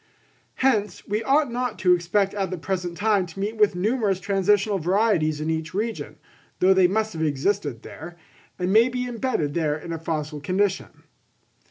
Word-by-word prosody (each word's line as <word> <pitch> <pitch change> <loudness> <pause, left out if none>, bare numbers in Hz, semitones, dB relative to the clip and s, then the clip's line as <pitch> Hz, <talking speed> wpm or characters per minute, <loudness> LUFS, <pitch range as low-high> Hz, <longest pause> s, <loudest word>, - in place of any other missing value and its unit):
Hence 220 -6 0
we 210 +2 -1
ought 275 +2 +2
not 245 -2 -2
to 180 -1 +4
expect 180 +3 +1
at 195 -3 -2
the 185 - -4
present 175 0 -3
time 205 -3 +2
to 170 +3 -11
meet 210 +3 -3
with 210 -3 +3
numerous 205 0 0
transitional 200 +1 +1
varieties 175 -4 +1
in 155 +1 -1
each 160 +2 -3
region, 225 +3 -3 0.4
though 190 +1 +5
they 190 -1 +5
must 220 +3 -1
have 160 - -5
existed 150 - -1
there, 170 +3 -10 0.4
and 180 +1 -1
may 230 +3 +6
be 250 0 -3
embedded 230 - -2
there 155 -2 0
in 165 +2 -7
a 165 - -4
fossil 155 -2 -4
condition. 190 +5 -1
190 Hz, 175 wpm, -24 LUFS, 165-215 Hz, 0.4 s, may